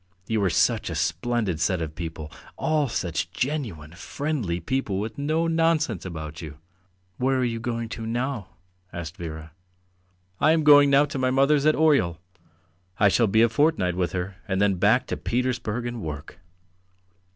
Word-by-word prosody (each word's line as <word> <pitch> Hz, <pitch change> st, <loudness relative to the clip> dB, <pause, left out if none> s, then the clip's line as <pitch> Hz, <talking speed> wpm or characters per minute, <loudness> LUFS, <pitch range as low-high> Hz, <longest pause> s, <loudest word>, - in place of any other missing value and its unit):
You 110 Hz, -1 st, 0 dB
are 95 Hz, -, +3 dB
such -, -, +1 dB
a -, -, -4 dB
splendid 120 Hz, -9 st, -1 dB
set 90 Hz, +2 st, +1 dB
of 80 Hz, -2 st, -4 dB
people! 80 Hz, -2 st, -6 dB, 0.3 s
All 150 Hz, -3 st, +1 dB
such 85 Hz, -7 st, -2 dB
genuine, 120 Hz, -, -3 dB
friendly 110 Hz, -, -3 dB
people 105 Hz, +1 st, -2 dB
with 110 Hz, +4 st, -5 dB
no 155 Hz, +3 st, 0 dB
nonsense 165 Hz, -, +1 dB
about 80 Hz, -3 st, -6 dB
you." 75 Hz, -3 st, -8 dB, 0.6 s
"Where 130 Hz, +1 st, +1 dB
are 130 Hz, -, +1 dB
you 115 Hz, -1 st, -2 dB
going 115 Hz, 0 st, -3 dB
to 115 Hz, 0 st, -6 dB
now?" 120 Hz, -3 st, -2 dB, 0.4 s
asked 85 Hz, -1 st, -6 dB
Vera. 80 Hz, -3 st, -7 dB, 0.9 s
"I 155 Hz, +2 st, +5 dB
am 160 Hz, -1 st, +1 dB
going 145 Hz, -1 st, +7 dB
now 140 Hz, +1 st, +5 dB
to 145 Hz, -1 st, -5 dB
my 130 Hz, 0 st, +2 dB
mother's 140 Hz, +3 st, +3 dB
at 155 Hz, -, +4 dB
Oryol; 140 Hz, -, +3 dB, 0.8 s
I 105 Hz, -1 st, +5 dB
shall 115 Hz, +3 st, +3 dB
be 110 Hz, +3 st, +4 dB
a -, -, +6 dB
fortnight 115 Hz, -, +1 dB
with 90 Hz, -1 st, -1 dB
her, 90 Hz, +1 st, -4 dB
and 95 Hz, -1 st, -1 dB
then 100 Hz, -1 st, +3 dB
back 115 Hz, +7 st, +3 dB
to -, -, -4 dB
Petersburg 125 Hz, -2 st, -2 dB
and 120 Hz, -1 st, -4 dB
work." 75 Hz, 0 st, -7 dB
115 Hz, 170 wpm, -25 LUFS, 90-140 Hz, 0.9 s, going